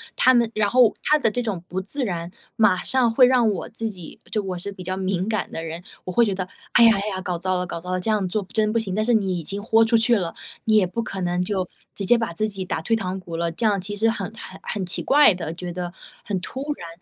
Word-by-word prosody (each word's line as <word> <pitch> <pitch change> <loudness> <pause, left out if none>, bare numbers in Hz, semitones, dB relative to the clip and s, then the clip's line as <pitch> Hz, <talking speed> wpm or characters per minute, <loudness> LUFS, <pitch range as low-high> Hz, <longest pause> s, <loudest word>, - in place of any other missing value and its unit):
他 255 - +5
们 235 -2 +3
然 215 -1 +1
后 245 -2 +5
他 305 - +4
的 230 -7 +1
这 245 - -1
种 205 -8 -3
不 185 +1 -3
自 260 +7 -1
然， 175 -3 -4 0.2
马 210 -5 +3
上 255 -3 +2
会 250 +3 +6
让 245 -3 +4
我 195 - -4
自 225 0 -3
己 180 -6 -11
就 215 - 0
我 185 -2 -4
是 190 +3 -5
比 190 -2 -9
较 185 +1 -3
敏 190 0 -1
感 215 -3 -2
的 165 - -5
人， 165 +2 -6 0.2
我 185 - -4
会 235 +6 +4
觉 200 -3 -1
得： 185 -1 -3 0.3
“哎 235 - +7
呀 230 - +8
哎 200 +2 -2
呀， 190 -2 -3
搞 180 -2 -2
糟 185 +1 0
了 180 - -1
搞 170 - -5
糟 180 - -9
了， 185 - 0
这 185 - -3
样 205 -3 +1
做 210 +3 -1
不 190 - -19
真 215 -1 +2
不 - - +2
行。” 200 -4 -3
但 215 - +1
是 240 +2 +2
你 195 -5 +1
已 - - -7
经 200 +6 -5
豁 225 +1 +4
出 230 +1 +4
去 230 +1 +4
了， 175 -4 -3 0.3
你 220 - +3
也 210 -3 +5
不 230 +6 -3
可 195 -3 -5
能 180 0 0
就 185 -1 -1 0.3
直 200 - -1
接 240 - +5
把 230 -6 -2
自 215 +6 0
己 195 -3 -5
打 - - -2
退 225 - +1
堂 190 -3 -3
鼓 175 -3 -8
了， 170 0 -1
这 225 +8 -3
样 200 -3 +2
其 205 +2 -4
实 220 +2 +2
很 225 - -4
很 190 - -10
很 200 -3 -3
奇 180 - -1
怪 290 -5 +6
的， 165 -3 -5
觉 175 0 -6
得 175 0 -4 0.3
很 195 -3 -2
突 260 - -6
然。 170 - -9
200 Hz, 310 characters per minute, -23 LUFS, 180-225 Hz, 0.3 s, 呀